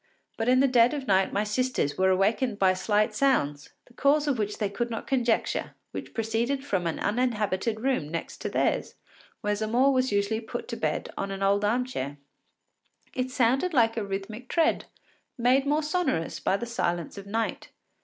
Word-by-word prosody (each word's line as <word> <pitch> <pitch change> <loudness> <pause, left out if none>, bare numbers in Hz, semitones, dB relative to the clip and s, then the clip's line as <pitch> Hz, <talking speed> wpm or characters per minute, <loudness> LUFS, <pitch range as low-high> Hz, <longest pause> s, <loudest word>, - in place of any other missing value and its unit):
But 225 +2 -1
in 255 +1 +5
the 275 - +5
dead 250 +1 +4
of 280 -2 -4
night 190 -4 +3
my 205 - 0
sisters 215 - 0
were 190 0 +3
awakened 205 +5 +1
by 190 -1 +4
slight 210 +3 +1
sounds, 150 - +1 0.2
the 245 - -21
cause 290 +4 +2
of 270 -5 +1
which 210 -1 -2
they 210 - 0
could 235 +5 -3
not 225 - -5
conjecture, 245 -4 0 0.2
which - - -7
proceeded 235 +5 -1
from 185 -9 0
an 165 - -2
uninhabited 215 -2 0
room 250 - 0
next 165 +1 -5
theirs, - - 0 0.5
where 210 0 0
Zamore 235 +6 +2
was 255 -1 +1
usually 205 +2 0
put 220 - -6
to - - -3
bed - - -2
on 195 - -2
an 195 0 -4
old 200 +1 +3
arm 240 +5 +2
chair. 145 - -5 1.0
It 255 0 -2
sounded 260 +8 +1
like 225 -2 +4
a 225 - -1
rhythmic 200 +5 -6
tread, 330 -1 +2 0.5
made 260 +3 +3
more 300 +2 +2
sonorous 300 - -1
by 195 - +1
the 235 - -4
silence 175 -6 -2
of 200 - -11
night. 225 +2 -2
225 Hz, 185 wpm, -27 LUFS, 200-255 Hz, 1.0 s, in